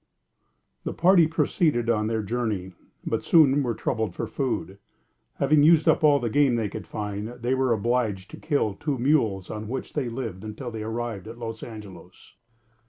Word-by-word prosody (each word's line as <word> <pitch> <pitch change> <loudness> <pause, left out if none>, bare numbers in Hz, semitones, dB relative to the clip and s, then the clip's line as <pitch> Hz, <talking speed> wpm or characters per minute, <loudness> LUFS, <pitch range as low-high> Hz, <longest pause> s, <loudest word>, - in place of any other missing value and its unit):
The - - -4
party 175 -1 +5
proceeded 155 - +1
on 110 -2 +1
their 110 -1 -1
journey, 105 -4 -2 0.3
but - - -1
soon 145 -4 +5
were 120 -4 -1
troubled 110 -3 -2
for - - -3
food. 120 -7 -3 0.6
Having 145 +2 +3
used 155 +1 +5
up - - +4
all 145 -2 +6
the 120 - -2
game 135 +2 +3
they 110 -3 -1
could - - -8
find, 105 0 -4
they 120 +1 -3
were 130 -1 +1
obliged 110 -3 0
to - - -9
kill 140 -9 0
two 145 +6 -3
mules, 115 -8 +1
on 105 0 -5
which 130 +4 -5
they 135 -5 -1
lived 115 -6 -5
until 110 +3 -6
they 110 -1 -6
arrived 110 -2 -4
at 115 +1 -9
Los 115 -1 -6
Angelos. 100 -5 -11
120 Hz, 175 wpm, -25 LUFS, 105-135 Hz, 0.6 s, all